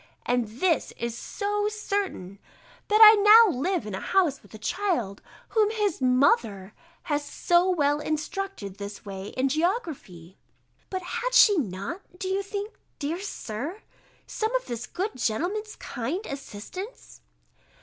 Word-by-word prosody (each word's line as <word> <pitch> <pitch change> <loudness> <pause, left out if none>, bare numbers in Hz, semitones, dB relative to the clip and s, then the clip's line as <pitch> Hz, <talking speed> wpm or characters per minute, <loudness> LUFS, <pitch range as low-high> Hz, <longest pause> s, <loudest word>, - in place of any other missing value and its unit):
And 245 -2 +1
this 315 - 0
is 235 0 -3
so 415 - -2
certain, 400 - -3 0.5
that 425 +1 +3
I 430 -1 +9
now 425 - +8
live 340 - -1
in 210 - -6
a 190 - -3
house 345 -8 +1
with 205 - -20
a - - -7
child, 235 - -2 0.3
whom 430 -2 +3
his 420 -8 -1
MOTHER 235 -6 +2 0.3
has 290 -1 -1
so 345 +5 +2
well 290 -5 +2
instructed 310 - -4
this 200 +1 -7
way 195 -1 -6
in 260 +1 +2
geography," 295 - -3 0.5
[But 375 -1 -4
_had - - -3
she 430 -4 +7
not, 205 - -4 0.2
do 375 - -4
you 385 +1 0
think, 405 +2 -5 0.2
dear 315 +4 -3
Sir, 330 - -6 0.4
some 445 +3 -2
of - - 0
this 240 0 -5
good 395 +4 -3
gentleman's 380 - -2
kind 290 - -4
assistance? 280 - -8
330 Hz, 140 wpm, -26 LUFS, -, 0.5 s, I